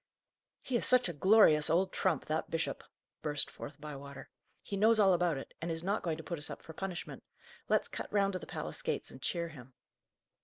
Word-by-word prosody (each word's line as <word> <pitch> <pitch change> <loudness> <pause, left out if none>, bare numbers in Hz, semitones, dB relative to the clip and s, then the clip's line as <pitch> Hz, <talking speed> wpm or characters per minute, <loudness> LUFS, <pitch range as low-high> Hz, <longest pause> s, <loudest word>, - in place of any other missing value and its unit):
"He 255 - -2
is 235 - +1
such 255 -3 +5
a 175 - -3
glorious 160 -2 +5
old 185 +4 +2
trump, 175 -7 +1
that 155 +1 -2
bishop!" 165 0 -2 0.4
burst 145 -2 0
forth 145 - -9
Bywater. 140 -2 -9 0.3
"He 200 - -4
knows 220 +3 +4
all 195 -2 +6
about 175 -4 +2
it, 135 - -8
and 170 - -2
is 165 0 -2
not 200 +3 0
going 165 -3 -2
to 160 - -8
put 170 -1 -4
us 150 - -4
up - - -8
for 160 - -10
punishment. 185 +1 -5 0.5
Let's - - +3
cut - - -6
round 200 -1 +2
to 185 - -2
the - - -10
palace - - -5
gates - - -2
and - - -12
cheer 170 -1 -1
him." 130 -4 -13
170 Hz, 215 wpm, -33 LUFS, 150-195 Hz, 0.5 s, all